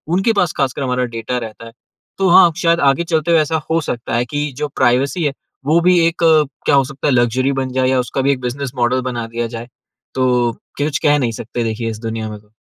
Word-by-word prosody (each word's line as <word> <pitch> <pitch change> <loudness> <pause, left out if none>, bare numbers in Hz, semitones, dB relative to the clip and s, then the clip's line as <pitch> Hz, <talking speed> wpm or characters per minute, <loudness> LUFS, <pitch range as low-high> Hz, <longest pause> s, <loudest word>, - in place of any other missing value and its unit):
उनके 205 +5 +2
पास 180 -5 +1
ख़ासकर 135 0 -1
हमारा 125 -1 0
डाटा 115 +2 -3
रहता 115 -1 -7
है। 115 - -11 0.5
तो 195 -1 +2
हाँ, 175 0 +7
शायद 170 -1 +2
आगे 140 +3 +3
चलते 165 -1 0
हुए 165 - +5
ऐसा 155 +1 -1
हो 165 - +2
सकता 120 -4 -4
है 120 +1 +1
कि 145 +2 -3
जो 150 - -2
प्राइवेसी 140 +8 +1
है, 145 -2 0 0.3
वो 155 +4 +4
भी 180 0 +4
एक, 165 - -1 0.5
क्या - - +4
हो 135 - +5
सकता 135 +3 -4
है, 140 - +3
लक्ज़री 125 +2 +2
बन 135 -1 -2
जाए, 130 0 +1
या 130 -1 +2
उसका 125 +2 -2
भी 140 +1 +2
एक 130 - -2
बिज़नेस 125 +1 -4
मॉडल 125 +1 +1
बना 120 -1 -4
दिया 115 0 -3
जाए। 115 +1 -7 0.5
तो 125 -2 +2 0.3
कुछ 145 0 -1
कह 145 0 +4
नहीं 120 -3 0
सकते, 115 +2 -4
देखिए, 115 0 -2
इस 110 -1 -6
दुनिया 110 -1 -4
में 105 -1 -8
तो। 105 0 -27
130 Hz, 235 wpm, -18 LUFS, 120-150 Hz, 0.5 s, हाँ